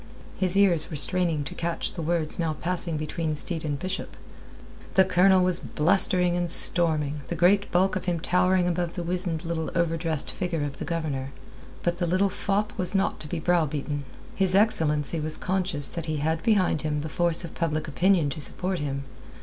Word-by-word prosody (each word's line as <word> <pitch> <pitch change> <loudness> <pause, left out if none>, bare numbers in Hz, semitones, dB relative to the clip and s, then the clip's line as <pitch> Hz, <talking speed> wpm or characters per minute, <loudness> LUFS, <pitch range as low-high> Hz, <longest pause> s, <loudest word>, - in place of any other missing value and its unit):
His 185 0 +1
ears 185 -6 +3
were 155 - -6
straining 155 +2 0
to 135 - -7
catch 170 0 -2
the 170 - -5
words 165 0 +1
now 165 -2 0
passing 170 0 -3
between 155 +1 -3
Steed 165 +2 0
and 145 -2 -2
Bishop. 185 +4 -5 0.8
The 190 - +6
Colonel 185 0 +4
was 180 -1 +2
blustering 180 +2 +3
and 175 -1 -1
storming, 155 -4 +3
the - - -3
great 195 +3 +3
bulk 185 +2 +2
of 185 - -4
him 175 -2 -1
towering 180 +2 +2
above 175 -1 -2
the 175 - -4
wizened 175 -1 -3
little 165 -1 -3
overdressed 165 -2 -1
figure 170 -4 -3
of 145 -1 -5
the - - -5
Governor. 145 -5 -3 0.5
But 175 0 -1
the 175 - 0
little 185 +3 +2
fop 205 +2 -2
was 185 +1 +2
not 195 - 0
to 150 - -7
be 165 +2 -4
browbeaten. 155 -4 -1 0.3
His 190 -1 +1
excellency 160 -7 +2
was 155 0 -1
conscious 185 -6 0
that 170 -1 -5
he 155 -1 -2
had 160 +2 -1
behind 200 -8 +2
him 150 -1 -2
the 155 - -5
force 170 +2 0
of 165 - -10
public 155 -2 -2
opinion 170 0 +2
to 150 - -4
support 180 +5 -2
him. 140 -2 -3
170 Hz, 190 wpm, -25 LUFS, 155-185 Hz, 0.8 s, The